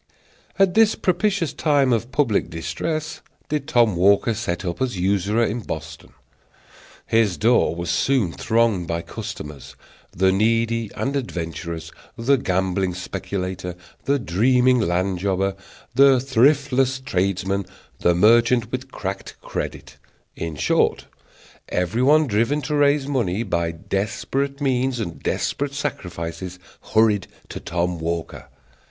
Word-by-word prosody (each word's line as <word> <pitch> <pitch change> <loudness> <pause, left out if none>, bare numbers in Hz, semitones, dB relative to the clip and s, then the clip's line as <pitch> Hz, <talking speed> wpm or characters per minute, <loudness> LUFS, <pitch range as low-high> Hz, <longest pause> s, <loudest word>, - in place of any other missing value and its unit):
At 195 -2 +4
this 220 -1 +5
propitious 185 -1 0
time 140 -5 +2
of 115 +2 -1
public 125 - +1
distress 155 - -4 0.3
did 150 -2 -2
Tom 115 -5 +3
Walker 100 +6 +4
set 95 -5 -3
up 85 +5 -4
as 125 -6 -1
usurer 100 +5 +1
in 115 +3 -2
Boston. 80 -6 -7 0.9
His 110 -5 +2
door 115 -5 +3
was 85 0 -3
soon 110 0 +1
thronged 110 -6 +1
by 85 0 -2
customers. 75 -2 -8 0.4
The 95 +2 +2
needy 115 +2 +1
and 140 +1 -2
adventurous, 85 - -4 0.3
the 125 +4 +3
gambling 95 -3 0
speculator, 90 -1 -4 0.3
the 140 +1 +2
dreaming 125 +4 +3
land 90 -1 0
jobber, 95 0 0 0.4
the 135 0 +6
thriftless 135 0 +2
tradesman, 95 -4 -1 0.3
the 85 - +3
merchant 115 +5 +4
with - - -5
cracked - - -6
credit - - -5 0.4
in 80 -2 -4
short, - - +1 0.6
everyone 130 - +3
driven 120 +5 0
to 150 - -3
raise 145 -1 +3
money 115 -7 -1
by 85 -5 -1
desperate 105 +11 -2
means 130 -2 0
and 85 -7 -5
desperate 140 0 -2
sacrifices 90 - -5 0.4
hurried 110 -3 +4 0.2
to - - -6
Tom 85 0 -2
Walker. 85 0 -4
110 Hz, 120 wpm, -22 LUFS, 90-130 Hz, 0.9 s, the